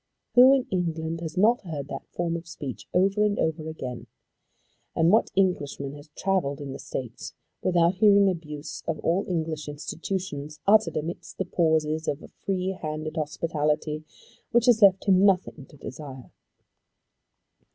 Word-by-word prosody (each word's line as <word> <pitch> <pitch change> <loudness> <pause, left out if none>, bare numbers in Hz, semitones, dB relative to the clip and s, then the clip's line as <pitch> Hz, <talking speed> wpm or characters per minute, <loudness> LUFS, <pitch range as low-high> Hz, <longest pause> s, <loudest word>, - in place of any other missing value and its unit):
Who 250 +2 +8
in 270 -2 +2
England 165 -2 -2
has 165 +1 -6
not 225 +6 +4
heard 155 -7 -5
that - - -6
form 170 -1 -2
of 170 0 -6
speech, 145 -6 -7
over 195 +3 +3
and 210 -1 +1
over 160 0 -1
again? 130 -6 -6 0.9
And 165 +1 +4
what 220 - +4
Englishman 145 -7 0
has 145 +1 -12
travelled 180 -8 0
in 140 -2 -6
the - - -8
States 120 -3 -6 0.3
without 175 -1 +3
hearing 200 -1 +6
abuse 150 -4 -4
of 165 - -1
all 175 +4 +1
English 160 -3 -2
institutions 150 0 -5
uttered 215 -2 +4
amidst 170 +4 -5
the 190 - -1
pauses 160 -2 +1
of 145 - -2
a - - -11
free 185 -1 -3
handed 155 0 -4
hospitality 155 -1 -1 0.5
which 235 -1 +3
has 240 -3 +5
left 195 -2 +6
him 190 -1 +5
nothing 185 -8 +2
to 145 - -17
desire? 135 -2 -9
165 Hz, 150 wpm, -26 LUFS, 150-190 Hz, 0.9 s, Who